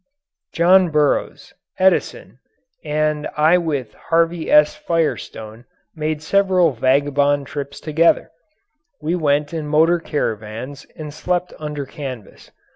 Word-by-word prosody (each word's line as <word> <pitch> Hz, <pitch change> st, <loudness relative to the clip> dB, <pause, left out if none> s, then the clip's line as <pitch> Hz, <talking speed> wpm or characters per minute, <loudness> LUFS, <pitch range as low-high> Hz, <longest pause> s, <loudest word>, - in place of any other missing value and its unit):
John 180 Hz, +2 st, +4 dB
Burroughs, 150 Hz, -2 st, 0 dB, 0.2 s
Edison, 190 Hz, 0 st, 0 dB, 0.4 s
and 150 Hz, -1 st, -1 dB
I 160 Hz, +4 st, +4 dB
with 145 Hz, -9 st, -3 dB
Harvey 165 Hz, 0 st, 0 dB
S. 150 Hz, 0 st, +5 dB
Firestone 120 Hz, -8 st, -3 dB, 0.3 s
made 155 Hz, 0 st, -3 dB
several 185 Hz, -2 st, +3 dB
vagabond 140 Hz, +3 st, +1 dB
trips 140 Hz, +1 st, -6 dB
together. 160 Hz, +2 st, +2 dB, 0.7 s
We 160 Hz, +3 st, -2 dB
went 150 Hz, -3 st, 0 dB
in 155 Hz, -2 st, -4 dB
motor 160 Hz, +3 st, +3 dB
caravans 120 Hz, -2 st, -4 dB
and 150 Hz, -2 st, -8 dB
slept 180 Hz, +3 st, -2 dB
under 150 Hz, -2 st, -5 dB
canvas. 130 Hz, -6 st, -9 dB
150 Hz, 110 wpm, -20 LUFS, 140-165 Hz, 0.7 s, S